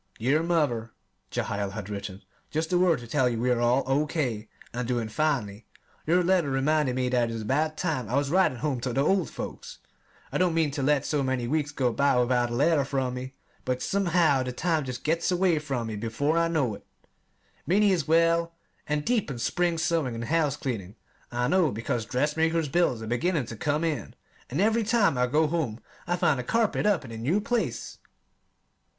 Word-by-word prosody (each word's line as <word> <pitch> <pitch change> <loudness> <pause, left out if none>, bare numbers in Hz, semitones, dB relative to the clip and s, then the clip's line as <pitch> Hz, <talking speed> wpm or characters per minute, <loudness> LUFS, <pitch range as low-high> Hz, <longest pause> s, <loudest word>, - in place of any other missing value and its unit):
Dear 135 +7 +2
Mother 145 -10 0 0.4
[Jehiel 100 -1 -2
had 105 -2 -6
written]: 100 -1 -6 0.3
Just 160 +3 -2
a 175 - +4
word 180 -3 +4
to 120 - -10
tell 130 +1 +2
you 115 -2 -2
we 125 +2 +1
are 120 -1 +1
all 125 +3 +3
O. 140 +3 +1
K. 120 -9 -2 0.2
and 125 0 -3
doing 120 -3 -1
finely. 115 -6 -1 0.4
Your 180 +3 +3
letter 175 -4 +2
reminded 135 0 +1
me 130 -1 0
that 120 -2 +1
it - - -4
was 115 -1 -4
about 155 +7 0
time 150 - -2
I 125 - -1
was 140 0 +1
writing 185 -8 +3
home 140 -1 -1
to 125 0 -2
the 135 - +2
old 195 +2 +2
folks. - - -7 0.5
I - - -1
don't 180 -3 +2
mean 160 -3 +2
to 140 0 -3
let 140 0 +2
so 150 -2 0
many 130 -3 -1
weeks 145 +1 0
go 130 -5 0
by 140 +1 +2
without 125 0 +2
a 120 - -3
letter 145 +2 +3
from 135 -2 -2
me, 130 +1 -7 0.3
but 125 0 -2
somehow 175 -8 +2
the 125 0 -3
time 160 +2 0
just 125 -1 -6
gets 165 +3 0
away 180 -3 +2
from 135 -6 -3
me 110 -1 -4
before 115 +8 -1
I 170 0 +3
know 150 -9 0
it. - - -10 0.8
Minnie 205 +3 +4
is 170 -6 0
well 165 +1 +3 0.3
and 150 0 -1
deep 235 -9 +1
in 130 - -5
spring 170 +8 0
sewing 160 -7 0
and 115 - -4
house 150 -1 +1
cleaning. 105 -8 -4 0.4
I 120 0 0
know 180 -1 +3
because 115 0 -3
dressmaker's 155 +4 +1
bills 135 -8 +1
are - - -5
beginning 140 +6 0
to 115 - -7
come 150 +7 -1
in, 150 -10 -3 0.3
and 140 - -3
every 220 +3 +3
time 220 - +3
I 125 0 +2
go 150 +5 +2
home 150 -8 -2 0.3
I 175 - +1
find 150 -6 +2
a - - -3
carpet 225 - +1
up 180 -9 +1
in 115 - -9
a 115 - -6
new 150 - +1
place! 235 +2 -2
140 Hz, 205 wpm, -27 LUFS, 125-165 Hz, 0.8 s, a